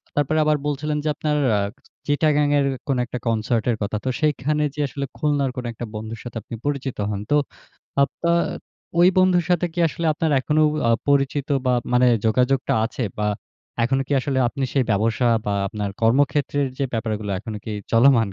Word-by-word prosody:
তারপরে 145 +2 +1
আবার 150 0 +3
বলছিলেন 150 +1 -1
যে, - - -2
আপনার 150 0 -1 0.2
আ - - +1 0.5
'চিটাগাং' 145 0 +2
এর 140 - +2 0.2
কোন 135 -3 +1
একটা 125 - -5
কনসার্টের 115 +1 +1
কথা 105 +1 -1
তো - - +1
সেখানে 150 0 +1
যে, - - -8
আসলে 140 +1 -4
'খুলনার' 145 -3 0
কোনো 125 -1 -3
একটা 120 +1 -6
বন্ধুর 110 +1 -6
সাথে 120 -2 -7
আপনি 115 - -8
পরিচিত 140 -3 -2
হন। 100 -2 -2
তো - - +5 0.7
আপনার 170 +4 +1 0.6
ওই 175 - +7
বন্ধুর 185 -2 +4
সাথে 175 0 +2
কি - - -7
আসলে 165 +2 -3
আপনার 160 +1 -1
এখনও 155 +3 +2 0.2
আ - - +4 0.2
পরিচিত 140 0 +1 0.2
বা 125 - +3 0.2
মানে 125 +1 +5 0.2
যোগাযোগটা 125 +4 +2
আছে 120 +2 -4 0.2
বা 105 - 0 0.6
এখনো 135 +3 +1
কি - - -1
আসলে 135 0 -1
আপনি 135 +2 -3
সেই 135 -2 +3
ব্যবসা 110 +4 +1 0.2
বা 105 - 0 0.2
আপনার 105 0 -4
কর্মক্ষেত্রের 140 +4 +2
যে, 140 - +1
ব্যাপারগুলো 110 -3 -2
এখনো 105 +2 -6
কি - - -5 0.2
চলমান 115 -2 +5
135 Hz, 175 wpm, -22 LUFS, 115-150 Hz, 0.7 s, ওই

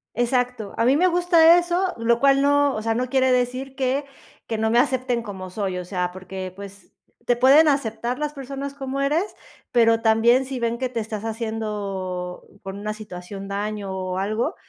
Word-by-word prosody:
Exacto, 245 -3 -1
a 230 - +2
mí 260 +3 +4
me 360 +5 +4
gusta 345 -1 +5
eso, 355 +1 0
lo 235 +1 +2
cual 275 +1 +4
no, 285 -1 +3
o 215 - -3
sea, 225 0 +1
no 250 +2 -2
quiere 260 -1 +3
decir 255 +2 -1
que 270 +2 0 0.4
que 225 - -3
no 220 - +1
me 235 - +2
acepten 255 -2 +1
como 190 -4 -7
soy, 190 -1 -3
o 180 - -6
sea, 180 -1 -2
porque, 185 0 -7
pues, 200 0 -12 0.3
te 245 -1 +2
pueden 280 +5 +6
aceptar 245 -2 -1
las 300 0 -2
personas 275 0 -6
como 270 -1 -5
eres, 295 +5 +2 0.5
pero 230 -2 +4
también 230 +3 +4
si 260 -1 -5
ven 235 0 -1
que 255 +1 -2
te 235 -2 -3
estás 215 -1 -5
haciendo, 205 -5 -4 0.2
por 195 0 -7
una 210 +1 -4
situación 195 -2 -8
daño 205 0 -3
o 185 -1 -3
algo, 215 - -1
235 Hz, 190 wpm, -23 LUFS, 205-270 Hz, 0.5 s, pueden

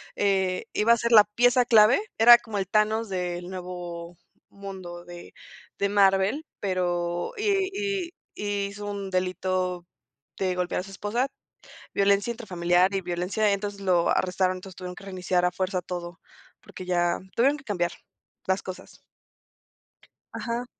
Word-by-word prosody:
eh, 190 -2 +1
iba 230 +3 +4
a - - +2
ser 235 +1 -1
la 210 -2 +9
pieza 245 +4 +3
clave, 225 - +6 0.2
era 240 +2 +9
como 225 -3 -6
el 195 -2 -1
Thanos 215 +2 +2
del 180 -1 -3
"Nuevo 175 -2 -7 0.3
Mundo" 190 -3 -9
de 175 0 -11 0.4
de 200 - 0
Marvel, 195 +7 +3 0.2
pero 175 -2 -1
y 395 -2 +1 0.4
y 340 - -13 0.2
y 205 -1 -2
hizo 205 +1 -8
un 200 -1 -4
delito 185 -1 -1 0.5
de 185 -1 0
golpear 180 0 -1
a - - -9
su 195 - -11
esposa, 210 +6 -1 0.7
violencia 200 +3 +2
intrafamiliar 185 -4 +1
y 195 - 0
violencia, 180 +4 0
entonces 200 0 -4
lo 180 -3 +2
arrestaron, 185 0 +1
entonces 185 0 -11
tuvieron 180 -1 -7
que 195 - -12
reiniciar 185 -1 -1
a 180 - +2
fuerza 185 0 -2
todo 175 0 -6 0.4
porque 185 - -10
ya 175 -1 +1 0.2
tuvieron 275 +5 +3
que 300 - -15
cambiar 175 -5 -1 0.6
las 190 +1 0
cosas. 185 -1 -10 1.3
Ajá. 235 +1 -3
190 Hz, 145 wpm, -26 LUFS, 180-210 Hz, 1.3 s, la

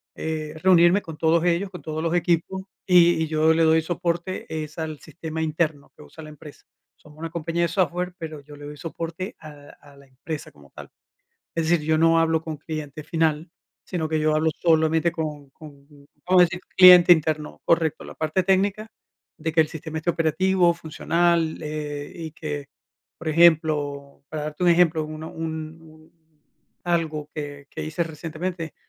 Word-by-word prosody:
eh, 155 -1 -4
reunirme 180 +1 +5
con 160 -5 -9
todos 165 +1 +2
ellos, 180 +3 +1
con 180 -2 -10
todos 155 0 -4
los 165 +1 0
equipos, 175 +2 0 0.2
y 175 -3 +5
y 160 - 0
yo 155 +1 +3
le 165 0 +2
doy 160 0 +4
soporte 175 +2 -3 0.2
es 155 +1 -11
al 160 -2 -5
sistema 160 -1 -6
interno 155 -2 -2
que - - -14
usa 160 +1 -13
la 155 - -10
empresa. 150 0 -13 0.3
Somos 150 0 -18
una 165 0 -5
compañía 170 +1 -2
de - - +3
software, 180 +1 -1
pero 155 -4 -7
yo 145 +1 -14
le 145 - -13
doy 150 0 -9
soporte 165 +5 -6
al 145 -2 -13
a 145 -1 -18
la 140 0 -18
empresa 145 +4 -7
como 70 -1 -20
tal. - - -11 0.7
Es 165 -1 -1
decir, 165 -3 +2
yo 155 0 +2
no 165 0 +4
hablo 165 0 +2
con 160 -1 -6
cliente 155 -1 -7
final, 160 0 0 0.3
sino 165 -4 -3
que 155 0 0
yo 155 0 +2
hablo 155 +1 +2
solamente 160 0 +2
con 150 -4 -5
con, 140 -1 -15 0.4
vamos 180 0 +5
a - - +9
decir 175 +1 -4 0.2
cliente 180 -1 +10
interno, 155 -2 0
correcto, 165 -2 +1
la - - -10
parte 155 +4 0
técnica 195 +3 +1 0.5
de 160 -1 -3
que 165 - +4
el 155 - +2
sistema 160 0 -6
esté 160 - -6
operativo, 175 +2 +2
funcional, 165 0 0
eh, 150 -1 -5
y 165 -2 -7
que, 150 -2 -6 0.5
por 165 - -5
ejemplo, 150 -4 +2
para 155 -1 -5
darte 150 +3 -6
un 175 - +5
ejemplo, 165 -2 +3
una 155 +1 -7
un 160 0 -6
un 155 0 -18 0.7
algo 160 -4 -1
que 145 -2 -7
que - - -6
hice 155 +2 -2
recientemente, 165 +1 -5
160 Hz, 180 wpm, -24 LUFS, 155-170 Hz, 0.7 s, cliente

